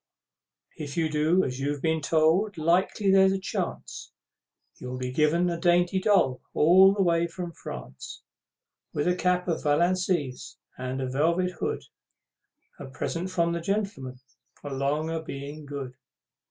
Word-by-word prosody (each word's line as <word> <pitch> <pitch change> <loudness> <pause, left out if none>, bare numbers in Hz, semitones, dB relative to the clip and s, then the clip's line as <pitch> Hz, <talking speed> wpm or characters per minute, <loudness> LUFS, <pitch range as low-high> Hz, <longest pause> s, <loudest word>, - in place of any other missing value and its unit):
If 145 -1 -6
you 160 -1 +1
do 155 +5 +2
as 125 0 -3
you've 145 +1 -2
been 160 -1 +1
told, 165 +7 +2
'likely 180 +5 +2
there's 190 0 +5
a 195 - -1
chance, 190 - -5 0.7
You'll 125 0 -6
be 125 0 -4
given 155 +5 +2
a 170 -1 -2
dainty 175 +1 +3
doll, 185 -11 +2
all 190 +5 +6
the 200 - +2
way 170 -1 +2
from 175 0 -6
France, 65 - -9 0.7
With 145 - -1
a 180 - +3
cap 180 0 0
of 165 -2 -1
Valenciennes, 170 -2 0 0.2
and 130 +1 -4
a - - -2
velvet 170 +7 +1
hood, - - -2 1.0
A 140 - -7
present 165 +7 -4
from 170 -2 +1
the 170 - -3
Gentlemen, 195 - -3 0.4
along 145 +3 -1
o' 165 -1 -2
being 145 0 -8
good! 140 -3 -6
165 Hz, 145 wpm, -27 LUFS, 140-180 Hz, 1.0 s, all